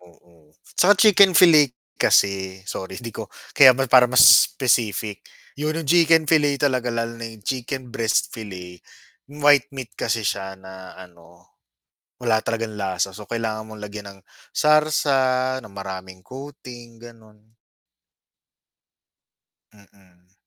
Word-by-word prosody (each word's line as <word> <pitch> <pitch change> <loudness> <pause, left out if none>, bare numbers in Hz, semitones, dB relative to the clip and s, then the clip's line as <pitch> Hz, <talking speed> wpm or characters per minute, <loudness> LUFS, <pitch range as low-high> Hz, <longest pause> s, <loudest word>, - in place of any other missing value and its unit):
Oo. 85 -3 -25 0.2
tsaka 205 +3 +4
chicken 195 -3 +5
fillet 155 -7 +5 0.3
kasi, 95 -1 +1
sorry 95 -1 -7
hindi 115 -2 -9
ko, - - -8 0.3
kaya 130 -3 +7
para 125 0 +5
mas 125 - +5 0.2
specific, 110 -5 -2 0.4
yun 155 +2 -3
yung 165 -3 -5
chicken 165 -1 +4
fillet 145 -2 +1
talaga, 130 -4 -1
lalo 115 0 -4
na 115 - -6 0.2
chicken 130 -1 -5
breast 115 -1 -1
fillet. 90 -5 -10 0.5
White 145 -2 +2
meat 130 -4 -9
kasi 115 -1 -3
siya 95 0 -4
na 95 0 -13
ano, 85 -1 -17 0.8
wala 115 -2 +1
talagang 115 -2 -4
lasa 95 -1 -2
so 105 -1 -11
kailangan 110 -2 -4
mong 110 -1 -12
lagyan 105 0 -9
ng - - -23 0.3
sarsa, 135 -4 +1
ng 110 -3 -14
maraming 95 -1 -9
coating 125 -3 -12
ganon. 110 -2 -18 2.2
Mm. 95 -3 -26
115 Hz, 125 wpm, -21 LUFS, 95-135 Hz, 2.2 s, kaya